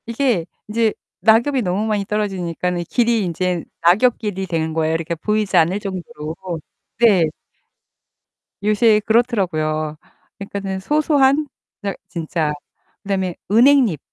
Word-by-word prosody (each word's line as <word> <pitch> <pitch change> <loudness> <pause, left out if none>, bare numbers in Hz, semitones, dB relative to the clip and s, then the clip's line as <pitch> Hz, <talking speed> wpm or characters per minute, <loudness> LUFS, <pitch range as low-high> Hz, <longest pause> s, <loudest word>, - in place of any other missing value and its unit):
이게 235 -7 0 0.2
이제 220 0 +1 0.3
낙엽이 235 +5 +4
너무 195 +1 -1
많이 210 -2 -1
떨어지니까는 180 -4 -2
길이 235 -4 +2
이제 180 0 -1 0.2
낙엽 205 +9 +4
길이 195 -3 -4
되는 160 -2 -1
거예요. 160 0 0
이렇게 165 +1 -2
보이지 210 +4 -1
않을 175 +5 +3
정도로. 185 -5 -6 0.6
네. 205 -8 +5 1.4
요새 215 +1 +4
그렇더라고요, 170 -10 +1 0.4
그니까는 195 -1 -4
소소한 290 +3 +2 0.3
그냥 200 -2 -3
진짜. 160 -2 -2 0.5
그 205 - -12
다음에 190 -3 -1 0.2
은행잎. 240 - +5
200 Hz, 290 characters per minute, -20 LUFS, 170-230 Hz, 1.4 s, 네